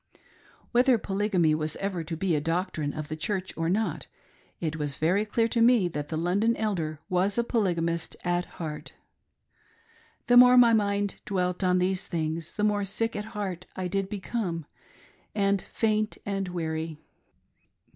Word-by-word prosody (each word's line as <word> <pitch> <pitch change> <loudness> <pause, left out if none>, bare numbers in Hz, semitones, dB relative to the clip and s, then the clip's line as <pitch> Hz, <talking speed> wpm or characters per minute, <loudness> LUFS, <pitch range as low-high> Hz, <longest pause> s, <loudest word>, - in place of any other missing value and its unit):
Whether 250 0 +4
Polygamy 195 -5 +1
was 155 0 -2
ever 190 -4 -3
to 165 0 -4
be 175 -1 +1
a 150 - 0
doctrine 165 -2 -1
of 155 0 -6
the 155 - -4
Church 185 +4 -3
or 165 0 -1
not, 215 +4 -1 0.5
it 160 -1 -2
was 145 -2 -2
very 185 +7 +2
clear 225 +2 +1
to 230 - +1
me 230 -5 +5
that 150 -2 -4
the 160 - -2
London 200 +8 +1
Elder 165 -8 -2
was 190 +2 +1
a 235 - +3
polygamist 170 -8 0
at 175 0 0
heart. 155 -3 -6 1.3
The 245 - +5
more 250 0 +9
my 240 -2 +7
mind 200 -2 0
dwelt 180 -2 -1
on 180 0 +3
these 185 0 0
things, 160 0 -3
the 210 - -1
more 205 -1 +2
sick 225 +4 -1
at 210 - -3
heart 185 -3 -4
did 190 +1 -1
I - - -23
become, 190 -5 -3 0.7
and 200 -2 +2
faint 215 -1 -1
and 195 -1 -2
weary. 160 -2 -3
185 Hz, 160 wpm, -27 LUFS, 165-210 Hz, 1.3 s, more